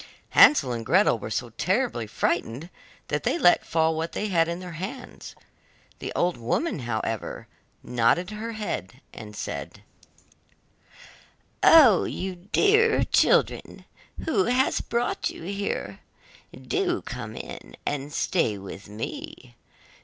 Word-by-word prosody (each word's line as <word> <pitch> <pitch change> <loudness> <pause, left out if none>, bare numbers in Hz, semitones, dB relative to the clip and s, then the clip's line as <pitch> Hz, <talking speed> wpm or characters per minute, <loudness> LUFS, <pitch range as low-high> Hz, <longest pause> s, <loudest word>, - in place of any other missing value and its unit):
Hansel 135 - +6
and 115 -1 -3
Gretel 155 - +3
were 105 - -6
so 120 +2 -3
terribly 185 - -1
frightened 125 - -2 0.4
that - - -1
they - - 0
let 175 - +5
fall 160 0 +1
what 165 +1 -3
they 210 - -2
had 165 -3 +3
in 170 +1 -3
their 180 -1 -8
hands. 190 +10 -8 0.6
The - - -5
old 175 0 +1
woman, 125 - -1
however, 115 -3 -4 0.4
nodded 125 - +1
her 225 +2 -5
head, 210 - -5
and 105 -2 -10
said: - - -6 1.8
'Oh, 270 - +7
you 190 0 -4
dear 415 - +3
children, - - +1 0.4
who 300 -12 +2
has 250 +2 +2
brought 235 +1 -1
you - - -10
here? 200 +3 -4 0.6
do 380 -3 -1
come 115 -4 -7
in, - - -9
and 145 0 -3
stay 130 - 0
with 100 +1 -10
me. 105 - -7
170 Hz, 125 wpm, -25 LUFS, -, 1.8 s, Oh